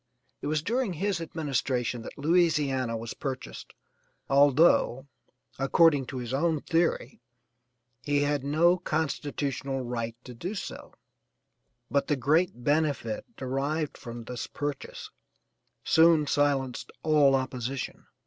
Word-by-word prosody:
It - - -4
was 155 0 0
during 235 0 0
his 190 +1 -1
administration 135 -7 -2
that - - -10
Louisiana 145 -7 +2
was 115 +1 -6
purchased, 130 -2 -6 0.5
although, 140 -2 +4 0.5
according 140 0 +4
to 130 - -6
his 125 0 -5
own 160 +3 +1
theory, 165 -7 0 0.8
he 145 +1 +1
had 145 -1 0
no 170 +5 +3
constitutional 140 -4 -2
right 115 -2 -4
to 125 - -10
do 180 - -5
so, - - -7 1.0
but 140 - +1
the 145 - +2
great 140 0 +1
benefit 145 -6 0
derived 140 +4 -2
from 120 0 -8
this 120 0 -5
purchase 145 -1 -5 0.7
soon 160 -2 +5
silenced 140 -3 0
all 150 -3 +5
opposition. 130 0 -4
140 Hz, 115 wpm, -28 LUFS, 130-155 Hz, 1.0 s, soon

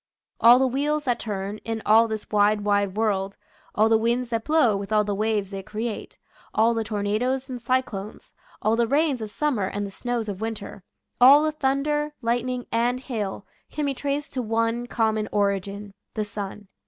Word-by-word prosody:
All 235 +2 +8
the 265 - +3
wheels 290 +4 0
that 245 -4 0
turn, 205 -1 -4
in 225 -1 -5
all 225 +2 +6
this 220 -1 -5
wide, 210 0 +3
wide 205 -1 +1
world, 200 -3 0 0.4
all 215 +1 +4
the 225 0 +4
winds 235 +2 0
that 230 -2 -1
blow 305 -9 +3
with 195 +1 -5
all 210 -1 +4
the 205 0 -2
waves 210 -1 -1
they 195 0 -5
create, 215 +3 -5 0.4
all 225 +2 +4
the 225 -1 -1
tornadoes 220 +5 -1
and 250 -2 -6
cyclones, 235 -5 -3 0.3
all 220 +1 +3
the 235 0 +2
rains 280 -1 +1
of 215 - -4
summer 235 -5 0
and 205 +1 -3
the 200 - -7
snows 240 +1 -3
of 200 -1 -5
winter, 220 -3 -5 0.4
all 280 +4 +8
the 310 - +1
thun 275 -2 0
der, 295 0 -1
lightning, 245 +1 -1
and 240 +2 +1
hail, 210 -7 -4 0.2
can 300 0 -3
be 280 - 0
traced 285 +2 -3
to 260 - -1
one 230 +1 -1
common 220 -2 0
origin 200 0 -1
— - - -57
the 215 -1 -1
sun. 205 0 -7
225 Hz, 190 wpm, -25 LUFS, 205-250 Hz, 0.4 s, All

